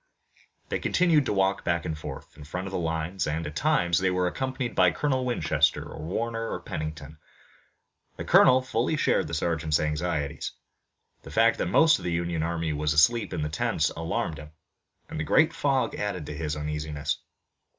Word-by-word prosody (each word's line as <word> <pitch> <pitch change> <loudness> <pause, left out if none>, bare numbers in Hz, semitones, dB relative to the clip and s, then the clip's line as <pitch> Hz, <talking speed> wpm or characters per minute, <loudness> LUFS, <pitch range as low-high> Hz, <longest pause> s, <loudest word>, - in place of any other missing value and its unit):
They - - -1
continued 165 -7 +2
to - - 0
walk 95 0 +1
back 85 -1 0
and 80 - -2
forth, 75 - -9
in 75 - -11
front 90 +6 -5
of 95 - -6
the - - -1
lines, 80 +2 -2
and, 80 +2 -2
at 75 +1 -6
times, 85 +2 +2
they 95 0 +2
were 90 0 +1
accompanied 130 +5 -2
by 90 - +5
Colonel 130 - 0
Winchester 115 -10 +1
or - - -9
Warner 115 +7 -3
or - - -3
Pennington. 75 -1 -6 1.0
The - - -4
colonel 130 0 +6
fully 130 +4 0
shared - - +2
the 85 - -3
sergeant's 80 -1 0
anxieties. 75 -2 -2 0.7
The - - -11
fact - - +3
that - - 0
most 160 - +5
of - - -11
the 90 - -2
Union 85 -1 -1
army 85 -1 -1
was 75 0 0
asleep 110 +10 +3
in 85 -4 -2
the 75 - -2
tents 75 - 0
alarmed 80 -1 -3
him, 75 - -10 0.6
and - - -6
the - - 0
great 160 - +3
fog 135 -2 0
added 100 -6 -3
to 75 - -6
his 75 0 -3
uneasiness. 75 -1 -3
85 Hz, 185 wpm, -27 LUFS, 75-115 Hz, 1.0 s, colonel